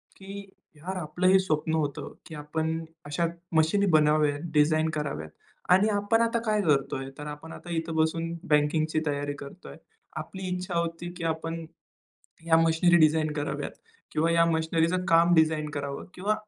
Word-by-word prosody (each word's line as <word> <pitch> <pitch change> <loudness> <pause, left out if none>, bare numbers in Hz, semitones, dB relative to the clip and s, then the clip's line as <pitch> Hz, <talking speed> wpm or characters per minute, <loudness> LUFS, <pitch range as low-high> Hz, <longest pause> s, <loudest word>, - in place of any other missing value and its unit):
की 200 +1 -9 0.3
यार 175 +6 -6
आपलं 180 +2 -1
हे 190 +1 +6
स्वप्न 160 -3 -1
होतं 145 -3 -3
की 160 - -9
आपण 160 +2 -3 0.2
अशा 145 +4 -1 0.3
मशीन 190 +6 +3
बनाव्या 150 -1 +4 0.2
डिझाइन 155 +1 +3
कराव्यात 140 - -4 0.4
आणि 195 +4 +4
आपण 205 +2 +2
आता 230 0 +1
काय 215 -1 +2
करत 140 -6 +1
आहे 135 0 -4
तर 150 - -7
आपण 150 +2 -8
आता 175 - -9
इथं 165 0 -3
बसून 160 +1 0 0.2
बँकिंगची 155 +1 +2
तयारी 145 0 -1
करत 140 +6 -11
आहे. - - -10 0.4
आपली 190 -1 -6
इच्छा 180 -1 -3
होती 170 +1 -4
की 175 - -6
आपण 165 0 -3 0.8
या 165 -1 +5
मशिनरी 165 +1 +4
डिझाइन 155 0 +3
कराव्यात 145 -1 -3 0.4
किंवा 160 +2 +1
या 165 0 +5
मशिनरीच 160 0 +1 0.2
काम 170 +1 +5
डिझाइन 155 -2 +2
करावं 140 -1 -5
किंवा 200 +4 0
160 Hz, 160 wpm, -27 LUFS, 150-175 Hz, 0.8 s, हे